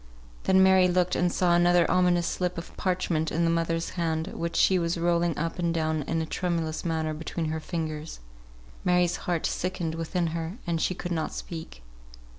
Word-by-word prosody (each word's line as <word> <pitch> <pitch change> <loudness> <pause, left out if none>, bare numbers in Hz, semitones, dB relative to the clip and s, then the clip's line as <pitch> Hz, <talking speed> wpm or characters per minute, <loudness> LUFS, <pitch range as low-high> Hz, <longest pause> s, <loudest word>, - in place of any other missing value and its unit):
Then 190 0 +5
Mary 190 -1 +6
looked 180 0 +1
and 175 0 +2
saw 175 -1 +2
another 175 0 +4
ominous 180 -1 +3
slip 180 0 -2
of 170 - -8
parchment 180 -4 0
in 170 - +1
the 165 - +3
mother's 165 0 -1
hand, 165 -1 -1
which 170 0 -4
she 190 -1 +4
was 170 0 -1
rolling 170 -1 +1
up 165 +3 -3
and 170 -1 +1
down 160 -2 0
in 165 - 0
a - - -3
tremulous 165 -2 -2
manner 160 -2 -1
between 160 +1 -3
her 160 0 -2
fingers. 155 - -4 0.6
Mary's 180 -1 +2
heart 170 -2 0
sickened 180 -3 -2
within 165 +2 -1
her, 165 +4 -4
and 165 -2 -1
she 185 - 0
could 175 0 -5
not 160 -2 -2
speak. 160 - -7
170 Hz, 185 wpm, -27 LUFS, 160-180 Hz, 0.6 s, Mary